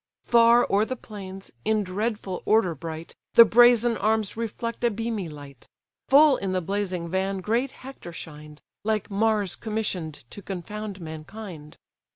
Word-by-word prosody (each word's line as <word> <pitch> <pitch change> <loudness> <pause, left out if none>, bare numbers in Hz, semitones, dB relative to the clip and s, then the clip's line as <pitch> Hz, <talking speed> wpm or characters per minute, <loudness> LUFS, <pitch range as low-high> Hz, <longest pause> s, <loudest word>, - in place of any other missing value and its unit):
Far 235 0 +5
o'er 200 +2 +4
the 255 +4 -3
plains, 195 -4 -9
in 215 -1 +1
dreadful 200 0 -3
order 215 -5 +3
bright, 160 +1 -7 0.2
The 230 - +11
brazen 240 0 +5
arms 215 -1 0
reflect 230 +1 -4
a 240 - +4
beamy 220 -4 -3
light: 145 -4 -12 0.4
Full 285 0 +7
in 190 -1 -3
the 185 - +1
blazing 185 -1 -2
van 190 +2 -1
great 230 +8 0
Hector 260 -9 -11
shined, 150 -2 -10 0.2
Like 215 -1 -1
Mars 210 -2 +1
commission'd 195 - -3
to 205 - -9
confound 200 +2 -6
mankind. 160 0 -9
205 Hz, 145 wpm, -25 LUFS, 175-225 Hz, 0.4 s, The